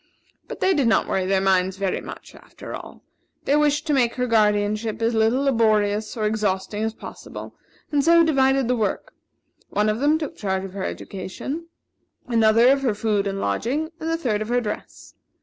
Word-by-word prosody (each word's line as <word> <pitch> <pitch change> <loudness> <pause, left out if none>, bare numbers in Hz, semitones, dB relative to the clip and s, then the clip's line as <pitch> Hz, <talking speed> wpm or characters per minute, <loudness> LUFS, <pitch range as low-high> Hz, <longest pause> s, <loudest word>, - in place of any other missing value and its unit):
But - - -8
they 380 - +3
did 280 -7 +2
not 225 - +2
worry 185 -1 -1
their 195 0 +2
minds 190 0 +2
very 195 -1 -1
much, - - -10
after - - -11
all. - - -9 0.4
They 280 - +3
wished 295 0 +2
to 305 - 0
make 245 -4 +2
her 250 - 0
guardianship 215 -1 +1
as 230 +1 +1
little 225 +4 +2
laborious 215 -4 +1
or 215 - -1
exhausting 210 -1 -1
as 220 0 -2
possible, - - -9 0.4
and 290 -2 +2
so, 335 +1 +6
divided 270 -4 +2
the 250 - +2
work; 215 -4 -2 0.6
one 210 +1 +1
of 215 +2 -1
them 295 +3 +3
took 305 -3 -5
charge 190 -2 -2
of 190 - -9
her 195 -1 -4
education, 270 - -6 0.6
another 230 0 +4
of 275 0 +3
her 240 -6 0
food 205 -2 0
and 195 0 -3
lodging, 260 - -1
and 320 - -3
the 330 - 0
third 225 -10 -1
of 215 - -4
her 245 +1 +2
dress. 210 -3 -7
225 Hz, 190 wpm, -23 LUFS, 205-270 Hz, 0.6 s, so